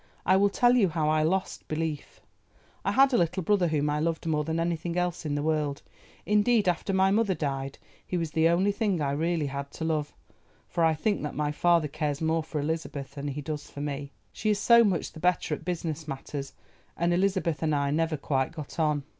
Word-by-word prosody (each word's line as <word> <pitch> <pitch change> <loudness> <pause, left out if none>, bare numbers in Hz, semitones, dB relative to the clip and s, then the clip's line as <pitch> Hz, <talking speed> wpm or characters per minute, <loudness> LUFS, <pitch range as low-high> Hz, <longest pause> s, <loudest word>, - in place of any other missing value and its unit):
I 185 - +5
will 200 +1 +4
tell 245 +4 +4
you 205 -7 +4
how 155 -2 0
I 155 0 +3
lost 185 +5 -1
belief. 155 -1 -4 0.6
I - - +1
had 270 0 +5
a 240 - +4
little 175 +2 0
brother 190 0 +2
whom 150 -2 0
I 150 - 0
loved 165 +1 -1
more 155 -2 +1
than 160 +2 -2
anything 170 0 -2
else 175 -2 -1
in 145 - -1
the 145 - -1
world, 150 -2 -1 0.4
indeed 210 0 +3
after 180 +3 0
my 190 0 +3
mother 205 -2 +2
died 135 -3 -3 0.3
he 180 - -3
was 165 -2 -2
the 160 +1 +3
only 185 +4 +3
thing 200 -3 0
I 140 -2 0
really 160 +2 0
had 140 0 -4
to 160 - -4
love, 155 -2 -1 0.6
for 170 - -1
I 160 -1 +4
think 205 +7 0
that 150 - -4
my 150 0 0
father 170 0 +3
cares 150 -1 -2
more 160 0 +1
for 155 -1 -4
Elizabeth 145 -3 -3
than 145 0 -5
he 145 +1 -4
does 150 0 -5
for 145 - -8
me, 140 -1 -4 0.2
she 215 - -2
is 210 - +3
so 235 +3 +6
much 190 -7 0
the 160 - -11
better 180 -2 +1
at - - -5
business 165 -3 -3
matters, 135 0 -6 0.4
and 170 +1 +1
Elizabeth 180 -5 0
and 155 -2 +1
I 140 0 0
never 160 +1 0
quite 135 -2 -1
got 155 -1 -8
on. 150 -3 +1
160 Hz, 220 wpm, -28 LUFS, 150-180 Hz, 0.6 s, so